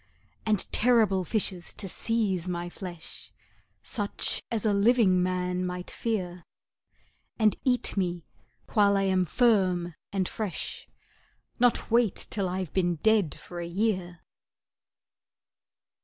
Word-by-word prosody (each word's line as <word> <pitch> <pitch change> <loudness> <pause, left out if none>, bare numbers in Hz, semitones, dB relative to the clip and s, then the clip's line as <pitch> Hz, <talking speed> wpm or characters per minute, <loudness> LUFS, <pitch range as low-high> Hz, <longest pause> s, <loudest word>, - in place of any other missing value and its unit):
And 210 -3 +2
terrible 220 -6 +3
fishes 185 -2 -1
to 200 - -3
seize 195 -3 0
my 175 -1 -3
flesh, 175 -4 -8 0.5
Such 205 -2 0
as 225 -2 -2
a 210 - +3
living 200 -3 +4
man 180 0 -1
might 180 0 -4
fear, 180 -6 -3 0.9
And 215 -2 +3
eat 250 -2 +1
me 175 -4 -1 0.5
while 200 -2 +4
I 195 - +1
am 190 -1 +2
firm 185 -5 +2 0.2
and 190 -2 0
fresh, 210 -6 -4 0.7
Not 245 -2 +2
wait 230 -4 +3 0.2
till 195 -3 -1
I've 185 -2 -4
been 175 -2 +1
dead 205 -2 +2
for 175 - -8
a 170 - -4
year! 180 -2 -1
190 Hz, 120 wpm, -28 LUFS, 180-215 Hz, 0.9 s, living